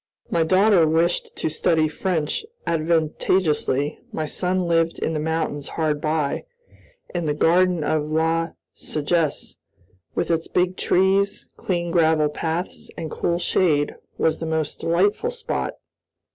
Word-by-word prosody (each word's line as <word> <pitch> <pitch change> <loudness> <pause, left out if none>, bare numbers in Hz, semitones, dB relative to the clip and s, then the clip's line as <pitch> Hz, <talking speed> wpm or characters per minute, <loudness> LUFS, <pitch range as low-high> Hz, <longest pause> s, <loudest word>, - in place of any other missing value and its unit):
My 170 - +2
daughter 185 +1 +4
wished 165 +2 +1
to - - -2
study 155 0 +2
French 160 - -1 0.2
advantageously, 155 -2 +1
my 155 - -2
son 180 +4 -1
lived 165 -1 +1
in 160 - -2
the 155 - -1
mountains 155 -2 -2
hard 155 -2 0
by, 155 - -1 0.7
and 175 -3 -2
the 145 - 0
garden 175 +1 +3
of 150 0 0
La 165 +1 +1 0.2
Sagesse, 155 0 -1 0.6
with - - 0
its 165 -1 0
big 180 +1 +1
trees, 195 +2 +2
clean 175 -2 -2
gravel 160 -3 +3
paths, 165 +4 -4
and 160 - -5
cool 170 - 0
shade, 155 -4 +1 0.2
was 160 - +1
the 165 - -4
most 160 -2 -1
delightful 200 - +1
spot. 485 0 -3
165 Hz, 130 wpm, -23 LUFS, 155-175 Hz, 0.7 s, daughter